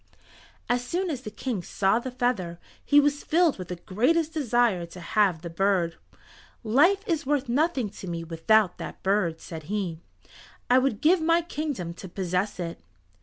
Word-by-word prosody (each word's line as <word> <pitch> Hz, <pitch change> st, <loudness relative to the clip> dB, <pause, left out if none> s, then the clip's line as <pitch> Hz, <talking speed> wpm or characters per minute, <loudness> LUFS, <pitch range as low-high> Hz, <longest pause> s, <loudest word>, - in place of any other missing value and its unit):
As 245 Hz, 0 st, +1 dB
soon 350 Hz, +7 st, -2 dB
as 265 Hz, -4 st, -4 dB
the 230 Hz, -, -6 dB
King 225 Hz, -2 st, -3 dB
saw 195 Hz, +5 st, +1 dB
the 260 Hz, -, -5 dB
feather 230 Hz, -9 st, -1 dB, 0.2 s
he 290 Hz, -, +5 dB
was 290 Hz, 0 st, +1 dB
filled 330 Hz, -, +2 dB
with 180 Hz, -, -6 dB
the 180 Hz, -, -4 dB
greatest 280 Hz, -, +1 dB
desire 240 Hz, -, +2 dB
to 175 Hz, +2 st, -11 dB
have 180 Hz, -2 st, +1 dB
the 170 Hz, -, -5 dB
bird. 180 Hz, -2 st, +1 dB, 0.7 s
"Life 300 Hz, -, +4 dB
is 320 Hz, -5 st, -1 dB
worth 285 Hz, -2 st, +1 dB
nothing 275 Hz, -1 st, +1 dB
to 190 Hz, -, -9 dB
me 170 Hz, -1 st, -4 dB
without 175 Hz, +5 st, +2 dB
that -, -, -8 dB
bird," 190 Hz, -5 st, +1 dB
said 160 Hz, -3 st, -8 dB
he. 190 Hz, -6 st, -2 dB, 0.7 s
"I 255 Hz, -, +7 dB
would 255 Hz, -5 st, 0 dB
give 335 Hz, +3 st, +4 dB
my 335 Hz, +1 st, +3 dB
kingdom 290 Hz, -, -4 dB
to 185 Hz, +2 st, -10 dB
possess 185 Hz, +2 st, -2 dB
it." 170 Hz, -, -5 dB
220 Hz, 170 wpm, -26 LUFS, 180-290 Hz, 0.7 s, I